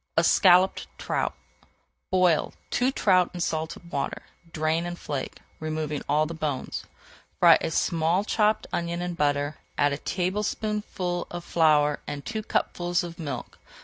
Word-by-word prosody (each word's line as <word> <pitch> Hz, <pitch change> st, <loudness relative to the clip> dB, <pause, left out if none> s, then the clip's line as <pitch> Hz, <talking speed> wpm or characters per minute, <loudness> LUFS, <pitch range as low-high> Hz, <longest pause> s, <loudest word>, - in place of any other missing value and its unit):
ESCALLOPED 180 Hz, +2 st, +5 dB
TROUT -, -, -1 dB, 0.8 s
Boil 180 Hz, -4 st, +2 dB, 0.2 s
two 255 Hz, +2 st, +2 dB
trout 185 Hz, -8 st, +3 dB
in -, -, -5 dB
salted 165 Hz, +1 st, -3 dB
water, 140 Hz, -, -3 dB, 0.3 s
drain 160 Hz, +2 st, 0 dB
and 175 Hz, 0 st, -5 dB
flake, 145 Hz, -5 st, -4 dB, 0.2 s
removing 155 Hz, -2 st, -3 dB
all 150 Hz, +1 st, +3 dB
the 165 Hz, -, -5 dB
bones. 150 Hz, -5 st, -3 dB, 0.5 s
Fry -, -, +7 dB
a -, -, -1 dB
small 165 Hz, +3 st, +1 dB
chopped 215 Hz, 0 st, +1 dB
onion 170 Hz, 0 st, -2 dB
in 180 Hz, 0 st, -3 dB
butter, 145 Hz, -1 st, 0 dB, 0.2 s
add 145 Hz, 0 st, +3 dB
a 140 Hz, -, -4 dB
tablespoonful 190 Hz, -1 st, -2 dB
of 175 Hz, 0 st, -6 dB
flour 150 Hz, -4 st, +3 dB
and 145 Hz, -1 st, -5 dB
two 220 Hz, -1 st, -3 dB
cupfuls 175 Hz, -4 st, 0 dB
of 170 Hz, 0 st, -8 dB
milk. 150 Hz, -4 st, -6 dB
170 Hz, 140 wpm, -26 LUFS, 155-180 Hz, 0.8 s, Fry